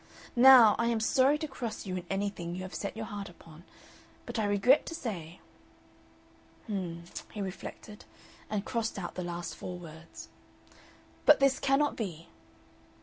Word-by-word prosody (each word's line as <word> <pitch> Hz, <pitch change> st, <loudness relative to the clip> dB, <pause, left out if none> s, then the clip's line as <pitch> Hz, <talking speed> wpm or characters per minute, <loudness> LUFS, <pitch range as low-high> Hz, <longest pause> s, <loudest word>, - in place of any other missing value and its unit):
Now 245 Hz, -3 st, +9 dB
I 230 Hz, -, +2 dB
am 235 Hz, -1 st, +1 dB
sorry 265 Hz, +6 st, +3 dB
to 310 Hz, 0 st, -4 dB
cross 240 Hz, -6 st, -6 dB
you 185 Hz, -2 st, -3 dB
in 180 Hz, -1 st, -5 dB
anything 195 Hz, -3 st, -3 dB
you 185 Hz, -, -5 dB
have 185 Hz, -, -8 dB
set 200 Hz, +2 st, -4 dB
your 220 Hz, -, -4 dB
heart 205 Hz, -2 st, -6 dB
upon, 165 Hz, -1 st, -15 dB, 0.6 s
but -, -, -4 dB
I 215 Hz, -, +1 dB
regret 205 Hz, +8 st, +4 dB
to 330 Hz, -, -4 dB
say 180 Hz, -, -6 dB, 0.6 s
" -, -, -30 dB
"H'm," 180 Hz, -5 st, -4 dB, 0.3 s
he 210 Hz, -, -8 dB
reflected, 200 Hz, +2 st, -7 dB, 0.4 s
and 210 Hz, -1 st, -2 dB
crossed 230 Hz, -3 st, -2 dB
out 175 Hz, -3 st, -5 dB
the 180 Hz, -, -4 dB
last 175 Hz, -1 st, -5 dB
four 180 Hz, -, -6 dB
words. 165 Hz, -1 st, -11 dB, 0.5 s
" -, -, -26 dB
but 300 Hz, -, +8 dB
this 275 Hz, -1 st, +3 dB
cannot 275 Hz, +2 st, +2 dB
be." 170 Hz, -7 st, -6 dB
205 Hz, 165 wpm, -30 LUFS, 175-235 Hz, 0.6 s, Now